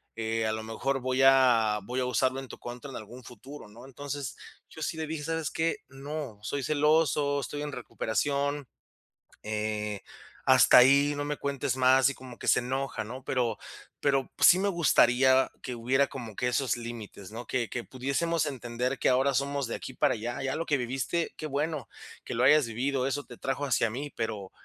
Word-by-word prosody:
eh, 115 0 -1
a - - 0
lo 110 0 -4
mejor 135 +5 -2
voy 130 +1 0
a 125 -5 +5
voy 125 +5 -3
a 125 - 0
usarlo 130 +2 +1
en 135 - -8
tu - - -10
contra 120 +3 -8
en 135 - -7
algún 120 +4 -10
futuro", 125 +3 -11
¿no? 115 +4 -13
Entonces, 140 0 -6 0.3
yo 160 - -12
sí 160 - -2
le 160 - -2
dije: 155 -1 -5
"¿Sabes 160 -2 -2
qué? 165 +1 0
No, 135 -4 -6
soy 135 +6 -3
celoso, 150 0 +2
estoy 145 +2 -5
en 150 - -4
recuperación, 140 +3 -2 0.8
eh, 105 -1 -3 0.4
hasta 130 0 +7
ahí, 140 +3 +6
no 145 - -2
me 145 0 -2
cuentes 140 -3 -2
más" 130 0 +5
y - - -5
como 130 -2 -11
que - - -5
se - - +5
enoja, 130 -1 -3
¿no?, 130 +5 -8
pero 125 -3 0 0.4
pero 135 -2 +1
sí 180 - +8
me 195 - 0
gustaría 130 -7 +4
que 125 - -5
hubiera 130 +4 +2
como 120 -5 -8
que 125 - 0
esos 125 -2 0
límites, 115 -4 -8
¿no?, 120 +2 -7
que 120 -3 -1
que 120 - -4
pudiésemos 150 +5 -1
entender 125 -1 -3
que - - +2
ahora 135 +2 +3
somos 140 -1 -1
de - - -3
aquí - - -8
para - - +2
allá, 120 +4 -4
ya 135 +2 -1
lo 165 - -3
que 150 - +2
viviste, 135 +7 -2
qué 155 - -5
bueno 150 -1 -2 0.4
que - - -5
lo 120 - 0
hayas 150 0 +6
vivido, 130 +3 -1
eso 140 +1 -2
te - - -12
trajo 140 +1 -2
hacia 115 -3 +2
mí, 140 +6 -5
pero 110 -4 -4
130 Hz, 195 wpm, -28 LUFS, 120-145 Hz, 0.8 s, sí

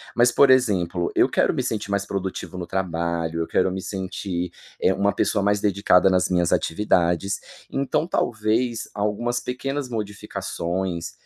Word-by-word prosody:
Mas 120 0 +5
por 140 +1 +5
exemplo, 95 -9 +2
eu - - +4
quero - - +2
me - - -1
sentir 105 -2 -3
mais 100 0 0
produtivo 95 -1 -4
no 90 - -4
trabalho, 85 -2 -2
eu 80 - -2
quero 95 - +2
me 95 0 -4
sentir, 95 -2 -4 0.3
eh, 95 - +4
uma 100 +1 +1
pessoa 100 -3 +1
mais 100 0 +2
dedicada 100 -2 +4
nas 90 0 +2
minhas 90 -2 +2
atividades. 90 0 +1 0.3
Então 140 +4 0
talvez 115 -2 0
algumas 105 +4 -1
pequenas 135 +2 -3
modificações, 95 -5 -3
100 Hz, 150 wpm, -23 LUFS, 90-110 Hz, 0.3 s, Mas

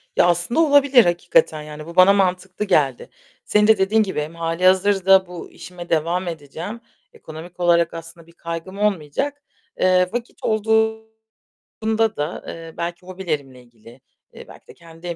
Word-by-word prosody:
Ya, - - +4
aslında 175 - 0
olabilir 280 - +5
hakikaten, 175 -2 +1
yani, 150 0 -9
bu 170 +1 -11
bana 185 +2 +7
mantıklı 185 +1 -1
geldi. 140 -9 +1 0.4
Senin 210 0 +3
de 220 - +5
dediğin 205 +3 +2
gibi 190 -7 -3
hem 155 +3 -7
hâlihazırda 185 +3 +3
bu 175 -1 -10
işime 175 -1 -11
devam 170 +3 0
edeceğim, 165 +7 -7 0.3
ekonomik 165 +3 -12
olarak 170 -1 +2
aslında 165 0 -10
bir - - -18
kaygım 170 +3 -7
olmayacak. 210 - -2 0.4
Eee, 185 0 +3
vakit 240 0 -5
olduğunda 220 0 -2 0.7
da, 150 +3 -4
eee, 165 -1 -9
belki 170 +1 -5
hobilerimle 155 -9 -5
ilgili, 120 +1 -18 0.3
eee, - - -12
belki - - -16
de - - -13
kendi 170 +1 -9
175 Hz, 145 wpm, -21 LUFS, 165-205 Hz, 0.7 s, bana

